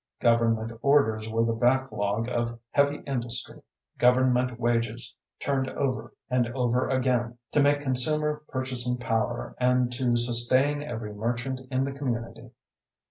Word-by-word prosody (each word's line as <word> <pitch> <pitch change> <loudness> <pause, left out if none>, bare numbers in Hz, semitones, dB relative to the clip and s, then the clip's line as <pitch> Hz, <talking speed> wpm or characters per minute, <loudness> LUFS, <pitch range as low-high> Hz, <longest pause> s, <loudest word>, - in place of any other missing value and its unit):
Government 115 -1 +1
orders 110 -6 +2
were 115 +1 0
the 115 - 0
backlog 115 -3 0
of 120 -1 -2
heavy 145 0 +1
industry; 120 -3 -2 0.4
government 125 -1 +2
wages 120 -1 -1 0.3
turned 135 -2 -1
over 130 -2 -3 0.2
and 125 -2 0
over 125 -1 0
again 125 -2 -1
to 145 - +3
make 145 0 +2
consumer 150 +3 +2
purchasing 125 -2 -1
power 120 0 -2
and 125 -1 +2
to 120 -1 0
sustain 125 +5 +5
every 115 -7 -6
merchant 120 +5 -3
in 130 0 0
the 135 0 -3
community. 120 -4 -5
125 Hz, 130 wpm, -26 LUFS, 115-130 Hz, 0.4 s, sustain